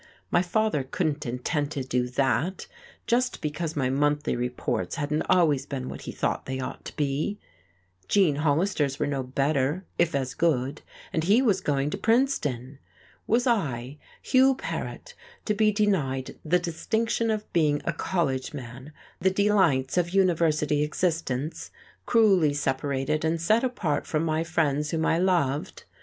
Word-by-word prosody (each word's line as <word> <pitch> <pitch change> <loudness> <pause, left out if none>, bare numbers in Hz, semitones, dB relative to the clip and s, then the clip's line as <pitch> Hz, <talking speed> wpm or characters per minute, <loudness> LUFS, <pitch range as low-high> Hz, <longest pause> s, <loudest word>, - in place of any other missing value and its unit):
My - - +4
father 215 -3 +1
couldn't 145 +1 -2
intend 140 +5 -2
to 135 - -3
do 125 -1 -1
that, 135 +8 0 0.4
just 250 +1 +1
because 155 +1 -3
my 130 -3 0
monthly 145 +1 +1
reports 125 0 -2
hadn't 150 0 -1
always 150 -6 +3
been 130 -3 -4
what - - -7
he - - -3
thought - - -2
they 130 0 -3
ought 130 - -6
to - - -8
be! 150 +8 -1 0.7
Gene 180 -8 +3
Hollister's 150 -1 +1
were 150 - 0
no 140 -2 -1
better, 140 +6 0
if 170 -3 +2
as 130 -2 -1
good, 145 -4 0 0.3
and 160 -1 0
he 205 +6 +5
was 205 -7 +2
going 145 0 0
to 200 - -4
Princeton. 150 - 0 0.5
Was 240 +3 +2
I, 145 - -1 0.2
Hugh 265 0 +4
Paret, - - -6 0.3
to 210 - +1
be 215 0 +3
denied 165 - 0
the 165 +3 +3
distinction 220 +7 -1
of 215 -1 -3
being 150 -3 +3
a 165 - 0
college 150 -6 -1
man, 130 +2 -9 0.3
the 190 - +3
delights 190 -9 +2
of 175 +2 -2
university 160 -5 +2
existence, 155 -2 -2 0.4
cruelly 195 -10 +4
separated 140 +2 -1
and 160 +1 0
set 215 +9 +2
apart 200 - -1
from 155 0 0
my 160 0 0
friends 150 -3 0
whom 160 0 -1
I 165 - +2
loved! 170 -7 0
155 Hz, 150 wpm, -26 LUFS, 140-185 Hz, 0.7 s, he